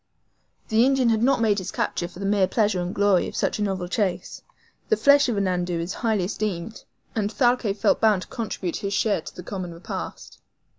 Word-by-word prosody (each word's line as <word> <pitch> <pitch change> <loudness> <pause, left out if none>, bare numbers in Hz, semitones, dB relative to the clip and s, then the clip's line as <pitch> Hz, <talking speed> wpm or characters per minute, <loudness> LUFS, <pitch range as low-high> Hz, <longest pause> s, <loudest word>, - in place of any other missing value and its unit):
The 220 +1 +4
Indian 265 -2 +3
had 220 -1 +2
not 255 0 +3
made 210 -3 +2
his 185 -1 -5
capture 175 - -2
for 175 - -15
the 195 - -4
mere 200 -1 +3
pleasure 205 -2 +1
and 175 +1 -3
glory 200 -2 +2
of - - -8
such - - -1
a - - -2
novel 190 -3 -1
chase. 185 0 -2 0.5
The 440 - +3
flesh 285 -1 +5
of 235 - 0
the 200 - 0
NANDOU 180 -2 -1
is 170 +3 -3
highly 220 -5 0
esteemed, 205 +1 -4 0.3
and 210 -2 -1
Thalcave 240 -2 +1
felt - - +2
bound 210 -4 +3
to - - -13
contribute 195 -6 -4
his 200 0 -3
share 215 -5 +1
of - - -10
the 180 - -8
common 180 -3 -6
repast. 170 - -7
200 Hz, 210 wpm, -24 LUFS, 185-225 Hz, 0.5 s, flesh